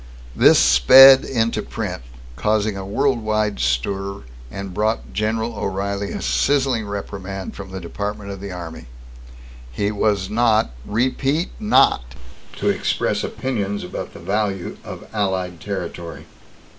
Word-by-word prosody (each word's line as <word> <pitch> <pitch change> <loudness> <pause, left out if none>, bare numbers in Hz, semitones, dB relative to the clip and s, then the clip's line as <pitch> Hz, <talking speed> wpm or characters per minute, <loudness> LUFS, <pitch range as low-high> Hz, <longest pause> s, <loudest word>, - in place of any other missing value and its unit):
This - - +6
sped 130 - +8
into 115 -3 0
print, - - -5 0.3
caused 105 +6 +1
a 100 - -5
world 120 +5 0
wide 110 - -1
stir, 95 +12 -1 0.3
and 100 +1 -7
brought 110 +3 -1
General 110 +2 -1
O'Reilly 100 0 -3
a - - -5
sizzling 135 -6 +1
reprimand 100 -1 -6
from 95 -1 -8
the 95 0 -6
Department 100 +3 -5
of 95 -1 -8
the 100 -1 -6
Army. 80 -7 -8 0.8
He 100 +11 -1
was 100 -2 0
not 110 - +2 0.2
REPEAT 135 - 0
NOT 60 - +3 0.4
to - - -1
express - - 0
opinions 105 -6 -3
about 90 - -6
the - - -9
value 100 -3 -2
of - - -9
allied 95 -4 -2
territory. 85 -4 -6
100 Hz, 130 wpm, -21 LUFS, 95-110 Hz, 0.8 s, sped